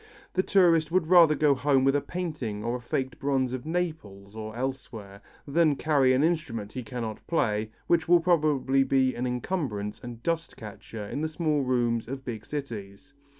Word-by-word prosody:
The 185 - +2
tourist 170 -5 +3
would 180 -2 +2
rather 165 -2 +6
go 150 -2 +4
home 140 0 +2
with 135 +1 +3
a 145 - +2
painting 150 - -4
or 120 +2 -2
faked 130 +2 -3
bronze 135 -3 0
of 130 +3 -5
Naples 130 - -4
or 110 0 -6
elsewhere, 115 -6 -6 0.3
than 155 0 +3
carry 140 -3 +3
an 130 +3 +2
instrument 120 -11 -1
he 130 - -4
cannot 115 -2 -6
play, 110 -9 0 0.2
which 165 -1 +2
will 175 0 +6
probably 150 -6 +2
be 130 -1 +2
an 125 +1 -3
encumbrance 125 - -3
and 120 -1 -9
dust 165 0 -2
catcher 105 0 -8
in 140 +8 -4
the 160 - 0
small 155 -2 0
rooms 120 -3 0
of 135 +1 -6
big 110 -3 -6
cities. 120 -3 -7
135 Hz, 175 wpm, -27 LUFS, 115-155 Hz, 0.3 s, rather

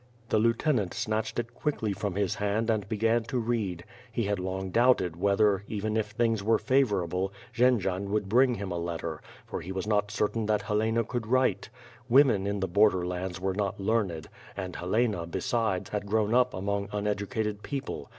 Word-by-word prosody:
The 110 - +3
lieutenant 115 - +1
snatched 110 0 -2
it 120 0 -3
quickly 120 -8 -1
from 100 -1 -3
his 100 -2 +1
hand 105 +3 0
and 105 -3 -2
began 115 +2 +2
to 120 +2 -2
read; 110 -7 -2 0.3
he 115 0 -1
had 100 -1 -1
long 95 0 -3
doubted 115 -7 +3
whether, 100 +2 +2
even 110 0 -2
if 110 -1 +1
things 115 0 0
were 110 +2 +3
favorable, 95 -9 +1 0.2
Jendzian 100 -6 +2
would 105 -1 0
bring 125 +4 +4
him 100 -2 -5
a 85 - -2
letter, 85 -2 -4 0.2
for - - -5
he 90 - -7
was 95 0 -3
not 105 -1 +1
certain 105 +1 -1
that 105 -1 +1
Helena 110 +3 +1
could 120 -1 -4
write. 130 +2 +1 0.4
Women 120 -7 +5
in 100 -1 -2
the 95 - 0
bor 100 +4 +5
der 90 -3 -3
lands 90 0 -4
were 95 0 -1
not 100 -1 -2
learned, 95 -6 0 0.3
and 95 -2 -4
Helena, 100 -1 0
besides, 100 +1 -1
had 105 -1 -3
grown 110 +1 +1
up 125 0 +3
among 100 +1 -2
uneducated 105 +1 -2
people. 135 -5 -5
105 Hz, 180 wpm, -28 LUFS, 95-115 Hz, 0.4 s, Women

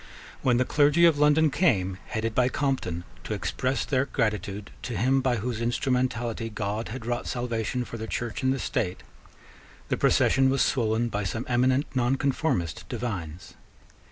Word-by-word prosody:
When 125 -2 +3
the 125 - +2
clergy 150 +5 +4
of 160 -4 +4
London 150 +1 +4
came, 95 - +1
headed 115 -1 -2
by 125 +2 +3
Compton, 130 - -1 0.2
to - - -3
express 130 +1 -1
their 135 -1 +1
gratitude 105 -3 -2
to 120 -5 -4
him 130 +6 +3
by 130 -2 +1
whose 115 +1 -3
instrumentality 120 -2 -1
God 105 +1 -3
had 120 0 -6
wrought 120 0 -2
salvation 120 0 -2
for 115 - -7
the 110 - -5
Church 115 -2 -3
and 130 0 +2
the 135 - 0
State, 90 -7 -2 0.9
the - - +1
procession 135 0 +3
was 135 +1 +3
swollen 115 -1 +1
by 105 -1 -2
some 110 +5 -3
eminent 130 +3 +2
nonconformist 130 - 0
divines. 95 -9 -5
120 Hz, 155 wpm, -27 LUFS, 110-130 Hz, 0.9 s, clergy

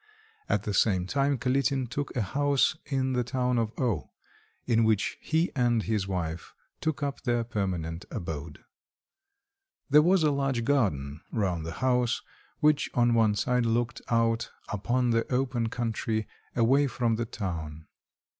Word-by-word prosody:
At - - +1
the 105 - -2
same 95 -3 +2
time 140 +6 +1
Kalitin 135 0 +1
took 140 +5 -4
a 120 - +1
house 140 +8 +2
in 130 -2 0
the 125 -1 +1
town 125 0 0
of 110 -2 0
O, 120 -6 -1 0.6
in 115 -2 +3
which 110 -2 +1
he 160 +2 +1
and 120 -4 +2
his 105 -4 -1
wife 85 -3 -4 0.2
took 155 -3 -2
up 140 -1 -3
their 120 -2 +1
permanent 90 -7 -3
abode. 80 -3 -6 1.3
There 150 +1 +8
was 180 +2 +4
a 150 - +4
large 135 -4 0
garden 75 - 0
round 90 -7 -1
the 80 - -4
house, 125 -2 +2 0.4
which 150 -1 +3
on 120 -1 +4
one 110 -2 +3
side 125 +3 +1
looked 120 +1 0
out 115 0 +1 0.2
upon 120 +4 0
the 115 +2 0
open 125 -3 0
country 110 -2 -2 0.3
away 135 +5 +4
from 120 -3 0
the 120 - -1
town. 80 -8 -5
120 Hz, 150 wpm, -28 LUFS, 105-130 Hz, 1.3 s, There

